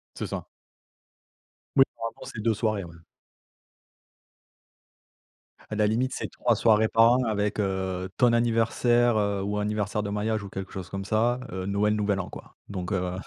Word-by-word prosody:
C'est - - -4
ça. - - -5 1.3
Oui, 135 - +9
par 115 -1 -5
rapport 115 - -10
à - - -7
ces 110 - -4
2 115 0 +2
soirées 110 -2 -1
ouais. 85 0 -11 2.8
À - - -2
la 105 0 +3
limite, 125 +5 +1
c'est - - -4
3 120 - +1
soirées 110 0 +4
par 115 +1 +5
an 125 +1 +3
avec, 105 -1 -1
heu, 95 -2 -1
ton 120 -2 +4
anniversaire, 120 0 +3
heu, 100 -1 0
ou 105 +1 -1
anniversaire 105 0 -1
de 100 - -4
mariage 105 +1 -1
ou 100 - -7
quelque 95 -1 -6
chose 95 -2 -7
comme 95 0 -5
ça, 115 +4 +1
heu, 95 +1 -4
Noël, 105 +1 +2
nouvel 100 -2 0
an, 95 - -3
quoi, - - -12
donc 95 -1 -4
heu 90 -2 0
105 Hz, 175 wpm, -27 LUFS, 100-115 Hz, 2.8 s, Oui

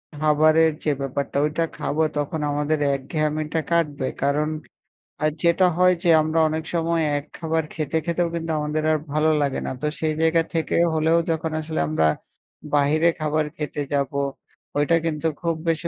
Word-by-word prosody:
খাবারের 155 +2 +4
যে 150 - +2
ব্যাপারটা 140 +1 -3
ওইটা 155 +2 0
খাবো 155 - -1 0.2
তখন 145 +2 -2
আমাদের 150 +1 0 0.2
একঘেয়ামিটা 155 +3 -2
কাটবে। 150 -6 +1 0.2
কারণ, 150 +2 +1 0.7
আ - - +3 0.2
যেটা 170 +2 +4
হয় 180 0 +5
যে 175 - +2
আমরা 160 +1 0
অনেক 160 +1 -2
সময় 165 0 +1 0.2
এক 145 - -4
খাবার 160 -1 -1
খেতে 155 +1 -2
খেতেও 170 0 0
কিন্তু 165 0 -3
আমাদের 150 +1 -2
আর 155 - +3 0.2
ভালো 155 +1 +3
লাগে 140 -2 0
না। - - -3
তো 150 - 0
সেই 155 -1 0
জায়গা 160 +1 +4
থেকে 165 -1 0 0.2
হলেও 160 +1 +3
যখন 160 0 -2
আসলে 155 0 -4
আমরা 80 +1 +1 0.7
বাহিরে 150 +4 +3
খাবার 155 0 0
খেতে 150 -1 -4
যাবো, 140 0 0 0.6
ওইটা 145 +3 +3
কিন্তু 160 -1 -1
খুব 170 -1 0
বেশি 165 +1 0
155 Hz, 165 wpm, -23 LUFS, 150-165 Hz, 0.7 s, হয়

